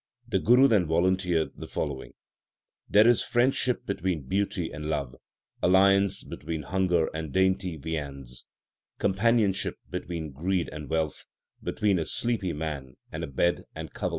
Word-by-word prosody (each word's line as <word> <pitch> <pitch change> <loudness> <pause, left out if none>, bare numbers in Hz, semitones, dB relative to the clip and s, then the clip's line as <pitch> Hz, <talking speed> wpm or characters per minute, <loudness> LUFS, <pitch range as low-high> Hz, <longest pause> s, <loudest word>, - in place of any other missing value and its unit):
The - - +1
Guru 125 +4 +6
then 105 - +3
volunteered 90 0 +1
the - - -8
following: 70 -4 -4 0.8
There 105 +2 +6
is 120 -1 +5
friendship 125 0 +1
between 95 -6 -2
beauty 95 -1 -1
and 75 0 -6
love, 70 -5 -2 0.5
alliance 100 +2 +4
between 80 -1 -5
hunger 90 -1 +1
and 80 -2 -4
dainty 95 -1 +1
viands; 70 -5 -6 0.5
Companionship 100 0 +2
between 80 -3 -5
greed 85 +6 -1
and 75 -2 -7
wealth, 80 -2 -1 0.4
between 100 -4 +1
a 80 - -2
sleepy 115 -7 -1
man 75 -5 -5 0.2
and - - -5
a - - -3
bed 85 +6 0
and - - -7
coverlet. - - -2
90 Hz, 140 wpm, -27 LUFS, 80-100 Hz, 0.8 s, Guru